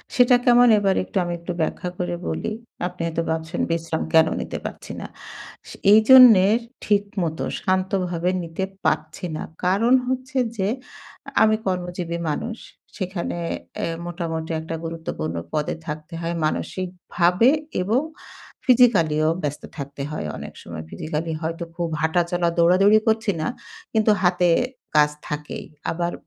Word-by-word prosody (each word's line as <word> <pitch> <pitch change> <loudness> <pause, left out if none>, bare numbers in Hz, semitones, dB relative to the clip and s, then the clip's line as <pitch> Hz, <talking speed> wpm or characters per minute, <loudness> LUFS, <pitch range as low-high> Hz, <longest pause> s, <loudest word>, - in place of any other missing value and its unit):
সেটা 250 0 +6
কেমন 245 0 +6
এবার 195 -2 +2
একটু 195 - -5
আমি 175 - -3
একটু 170 +1 -5
ব্যাখ্যা 180 +3 -2
করে 175 -1 -2
বলি। - - -2 0.4
আপনি 180 -1 -8
হয়তো 165 0 -1
ভাবছেন, 160 +2 -3
বিশ্রাম 165 -1 -1
কেন 160 0 +6
নিতে - - -5
পারছি - - -7
না। - - -6 0.6
সে - - -9 0.2
এইজন্যে 220 -3 +8 0.4
ঠিকমত 200 -6 0 0.2
শান্তভাবে 185 -2 0
নিতে 165 +3 -4 0.2
পাচ্ছি 155 +4 -1
না। - - -4 0.2
কারণ 215 +7 +3
হচ্ছে 260 +1 -3 0.2
যে, 190 0 0 0.7
আমি 215 0 +5
কর্মজীবী 175 -2 -2
মানুষ। 230 +9 -3 0.4
সেখানে 180 -3 -3 0.5
এ - - 0 0.2
মোটামুটি 165 -2 -4
একটা 160 +1 -5
গুরুত্বপূর্ণ 160 - -4 0.2
পদে 150 -1 -1
থাকতে 155 +2 -6
হয়, 170 +1 -2
মানসিকভাবে 180 +5 +1 0.3
এবং 220 +8 +2 0.6
physically 240 - +5
ও - - +4
ব্যস্ত 145 0 -3
থাকতে 140 -1 -6
হয় 150 - -4
অনেক - - -8
সময়। 80 -2 -7
Physically 155 - -3
হয়তো 165 +1 -3
খুব 170 -1 -2
হাঁটা-চলা, 170 +1 +1
দৌড়াদৌড়ি 185 +5 +5
করছি 220 -1 +2
না। - - -1 0.5
কিন্তু 220 -1 +4
হাতে 180 -1 +3 0.5
কাজ 150 0 +6 0.2
থাকেই। 150 0 -5 0.3
আবার 170 +1 -2
175 Hz, 135 wpm, -23 LUFS, 160-200 Hz, 0.7 s, এইজন্যে